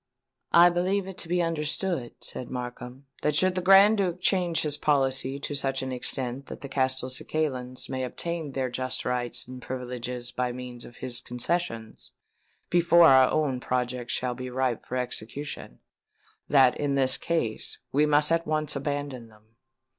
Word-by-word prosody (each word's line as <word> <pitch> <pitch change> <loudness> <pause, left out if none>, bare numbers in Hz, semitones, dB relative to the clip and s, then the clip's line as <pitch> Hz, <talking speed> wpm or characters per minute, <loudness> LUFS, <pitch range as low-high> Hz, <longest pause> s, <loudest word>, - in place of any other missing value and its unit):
"I 175 +1 +9
believe 185 +3 0
it 190 -1 -9
to - - -3
be 175 +1 +1
understood," 160 -3 -2
said 125 - -7
Markham, 125 +1 -7 0.2
"that 150 -1 +1
should 185 +4 +3
the 185 - -1
Grand 195 +3 +7
Duke 180 -2 0
change 180 -3 +1
his 150 -2 0
policy 135 -2 +1
to 145 - -3
such 135 -1 -1
an 130 - -4
extent 130 +1 -2
that - - -8
the 140 - -6
Castelcicalans 130 0 -1
may 130 0 -3
obtain 160 +3 -4
their 130 -1 -1
just 130 +1 -2
rights 120 -1 -2
and 130 0 -9
privileges 125 -1 -5
by 125 0 -1
means 125 -1 -7
of 120 - -13
his 125 -1 0
concessions, 125 -3 -3 0.6
before 170 -1 +6
our 130 -1 +7
own 145 -5 0
projects 125 -1 -2
shall 125 -1 -1
be 125 +1 -6
ripe 125 -2 -1
for 125 - -4
execution,—that, 130 +1 -2
in 145 -1 0
this 130 -1 +3
case, 140 -11 -2
we 150 +2 +2
at 160 +3 +3
once 155 -1 0
abandon 140 -3 -3
them." 110 0 -22
135 Hz, 155 wpm, -27 LUFS, 125-155 Hz, 0.6 s, I